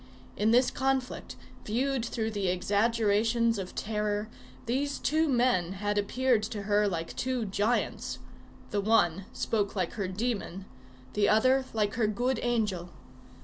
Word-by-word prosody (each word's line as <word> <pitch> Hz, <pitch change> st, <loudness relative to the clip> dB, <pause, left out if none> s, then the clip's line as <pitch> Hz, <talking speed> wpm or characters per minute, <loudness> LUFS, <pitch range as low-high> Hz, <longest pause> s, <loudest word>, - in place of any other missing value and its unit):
In 210 Hz, +2 st, +2 dB
this 250 Hz, +3 st, +4 dB
conflict, 265 Hz, -1 st, -1 dB, 0.3 s
viewed 255 Hz, +3 st, 0 dB
through 225 Hz, -1 st, -2 dB
the 200 Hz, -3 st, -1 dB
exaggerations 220 Hz, +4 st, +2 dB
of 185 Hz, -1 st, -6 dB
terror, 210 Hz, 0 st, -2 dB, 0.4 s
these 275 Hz, +4 st, -1 dB
two 315 Hz, +2 st, +1 dB
men 240 Hz, -9 st, +2 dB
had 205 Hz, +1 st, -1 dB
appeared 245 Hz, +3 st, +2 dB
to 210 Hz, -1 st, -4 dB
her 205 Hz, +1 st, +2 dB
like 165 Hz, -4 st, -3 dB
two 255 Hz, -3 st, -1 dB
giants; 210 Hz, +4 st, -1 dB, 0.5 s
the 205 Hz, -, +1 dB
one 195 Hz, -4 st, +2 dB
spoke 205 Hz, -2 st, -1 dB
like 185 Hz, -4 st, -1 dB
her 200 Hz, -4 st, -2 dB
demon, 195 Hz, -2 st, -3 dB, 0.5 s
the 205 Hz, -1 st, +3 dB
other 255 Hz, +5 st, +4 dB
like 210 Hz, -2 st, +1 dB
her 215 Hz, -, +4 dB
good 240 Hz, +3 st, 0 dB
angel. 210 Hz, -8 st, -1 dB
215 Hz, 140 wpm, -29 LUFS, 200-245 Hz, 0.5 s, this